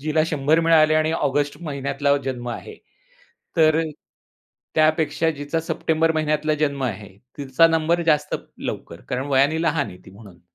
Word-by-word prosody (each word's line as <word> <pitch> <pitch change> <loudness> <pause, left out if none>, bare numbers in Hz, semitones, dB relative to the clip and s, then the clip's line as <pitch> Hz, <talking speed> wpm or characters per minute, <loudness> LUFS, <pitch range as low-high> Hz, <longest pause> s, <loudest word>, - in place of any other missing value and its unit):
जिला 155 +2 +1
100 150 +1 +2
मिळाले 155 -2 +4
आणि 155 0 +2
ऑगस्ट 145 -1 0
महिन्यातला 140 -1 0
जन्म 125 -2 -4
आहे, 435 - -7 0.8
तर 155 -1 +5
अ, - - +1 0.9
त्यापेक्षा 155 0 +2
जिचा 145 +3 -2
सप्टेंबर 160 0 0
महिन्यातला 155 0 0
जन्म 140 -2 0
आहे, 105 -4 -4 0.3
तिचा 140 +3 +3
नंबर 165 +1 +1
जास्त 150 -2 +1 0.2
लवकर 85 - -6
कारण 130 +1 -2
वयाने 145 +4 +2
लहान 160 -3 0
आहे 90 - -10
ती 95 - -13
म्हणून. 100 -4 -15
150 Hz, 150 wpm, -22 LUFS, 135-160 Hz, 0.9 s, तर